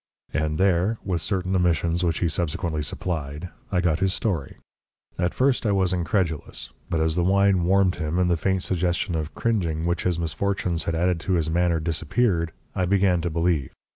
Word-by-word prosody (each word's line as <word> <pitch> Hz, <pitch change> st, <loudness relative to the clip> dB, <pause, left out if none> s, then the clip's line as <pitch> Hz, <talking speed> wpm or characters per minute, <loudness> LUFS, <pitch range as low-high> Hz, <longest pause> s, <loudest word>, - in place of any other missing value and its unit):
And 75 Hz, 0 st, 0 dB
there 95 Hz, +3 st, +2 dB
with 90 Hz, -4 st, -1 dB
certain 95 Hz, -1 st, -1 dB
omissions 85 Hz, -1 st, +1 dB
which 85 Hz, -2 st, 0 dB
he 85 Hz, -, +3 dB
subsequently 80 Hz, -1 st, -2 dB
supplied 75 Hz, +2 st, -4 dB, 0.2 s
I 90 Hz, -2 st, +2 dB
got 85 Hz, -2 st, +1 dB
his 95 Hz, 0 st, +1 dB
story. 90 Hz, -, -2 dB, 0.6 s
At 90 Hz, -1 st, 0 dB
first 130 Hz, -1 st, +2 dB
I 105 Hz, -, +1 dB
was 95 Hz, -2 st, +2 dB
incredulous, 85 Hz, -3 st, -2 dB, 0.2 s
but 85 Hz, -, 0 dB
as 80 Hz, 0 st, +1 dB
the 90 Hz, +1 st, +1 dB
wine 95 Hz, -1 st, +3 dB
warmed 95 Hz, 0 st, +3 dB
him, 80 Hz, +2 st, -2 dB
and 90 Hz, -1 st, +3 dB
the 85 Hz, -, +3 dB
faint 95 Hz, +2 st, 0 dB
suggestion 90 Hz, 0 st, 0 dB
of 80 Hz, -1 st, -3 dB
cringing 95 Hz, -8 st, 0 dB
which 85 Hz, 0 st, 0 dB
his 90 Hz, -2 st, 0 dB
misfortunes 85 Hz, 0 st, -1 dB
had 85 Hz, -, -1 dB
added 90 Hz, +1 st, +1 dB
to 95 Hz, +3 st, -2 dB
his 80 Hz, -2 st, +1 dB
manner 85 Hz, 0 st, +2 dB
disappeared, 85 Hz, +2 st, 0 dB, 0.2 s
I 90 Hz, -, +1 dB
began 95 Hz, -2 st, +2 dB
to 85 Hz, -, -1 dB
believe. 85 Hz, -4 st, 0 dB
90 Hz, 185 wpm, -24 LUFS, 80-95 Hz, 0.6 s, he